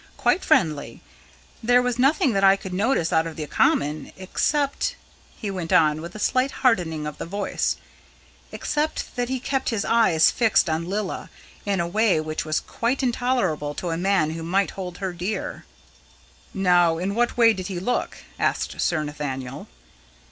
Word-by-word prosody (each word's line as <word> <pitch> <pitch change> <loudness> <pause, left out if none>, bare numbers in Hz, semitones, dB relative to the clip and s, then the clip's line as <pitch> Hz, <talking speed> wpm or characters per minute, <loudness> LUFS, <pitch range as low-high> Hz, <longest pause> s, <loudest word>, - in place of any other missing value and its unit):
"Quite 370 - +2
friendly. 150 - +1 0.6
There 245 +2 +4
was 250 -1 -1
nothing 270 -1 +3
that 195 0 +1
I 195 0 +7
could 190 -2 -8
notice 200 -3 +1
out 160 0 +3
of 160 - -7
the 155 - -4
common 150 0 +1
except," 280 +9 0 0.4
he 205 - -4
went 180 -4 -5
on, 155 -1 +4
with 170 +3 -8
a - - -5
slight 255 +5 +1 0.2
hardening 165 -10 +2
of 150 -1 -6
the - - -4
voice, 200 +3 -1 0.8
"except 300 +1 -2
that 245 -1 -1
he 260 0 -1
kept 270 +1 -1
his 220 -3 -1
eyes 220 -9 +4
fixed 225 -6 +3
on 165 +2 -2
Lilla, 200 -1 -3 0.4
in 200 -2 +1
a 170 - +1
way 205 -1 +2
which 155 +1 -3
was 155 -1 0
quite 250 +4 -2
intolerable 235 - 0
to 180 - -4
any 165 +1 -2
man 190 -5 +2
who 165 +1 -5
might 190 +4 0
hold 180 -2 -7
her 190 -2 -3
dear." 180 +5 -4 0.9
"Now, 175 -3 +3
in 185 +4 -2
what 240 +3 0
way 230 -2 +6
did 185 -3 -5
he 185 -3 -4
look?" 245 +7 -2 0.2
asked - - -1
Sir 155 -3 +1
Nathaniel. 135 -3 -5
190 Hz, 170 wpm, -24 LUFS, 160-230 Hz, 0.9 s, I